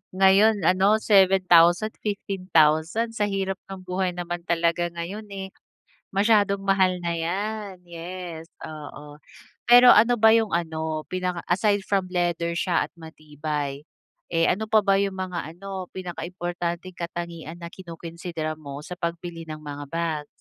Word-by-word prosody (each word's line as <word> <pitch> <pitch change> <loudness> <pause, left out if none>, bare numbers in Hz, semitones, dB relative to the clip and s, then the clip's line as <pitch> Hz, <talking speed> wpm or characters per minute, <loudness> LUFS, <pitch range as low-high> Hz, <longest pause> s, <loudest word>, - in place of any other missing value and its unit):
Ngayon 195 +1 +5
ano 190 +4 +4
7,000, 190 0 +5
15,000, 185 0 +1
sa 210 -2 0
hirap 195 -1 -2
ng 190 -1 -8
buhay 180 0 -2
naman 175 0 -4
talaga 170 0 +1
ngayon, 180 +6 -6
eh, 190 -1 -7 0.6
masyadong 200 -1 +3
mahal 190 -2 +2
na 170 -1 -2
yan, 195 +2 -3
yes, 170 -1 -7 0.2
oo. 150 -1 -9 0.5
Pero 245 +1 +9
ano 235 +3 +6
ba 220 0 +6
yung 225 -4 +3
ano, 160 -2 -2
pinaka 180 -1 -2
aside 200 +2 +2
from 195 -2 0
leather 175 -1 -1
siya 175 0 +1
at - - -39
matibay, 150 -3 -5 0.5
eh, 165 -1 +2
ano 215 +3 0
pa 220 -1 +5
ba 195 0 +4
yung 195 -1 -2
mga 180 -4 -4
ano 190 -1 -6
pinaka-importanteng 175 0 -5
katangian 170 -1 -6
na 170 - -7
kino-konsidera 170 -2 -6
mo 140 -2 -8
sa 180 - -6
pagbili 170 -1 -5
ng 155 0 -6
mga 145 -1 -7
bags? 160 -3 -2
175 Hz, 140 wpm, -25 LUFS, 165-195 Hz, 0.6 s, Pero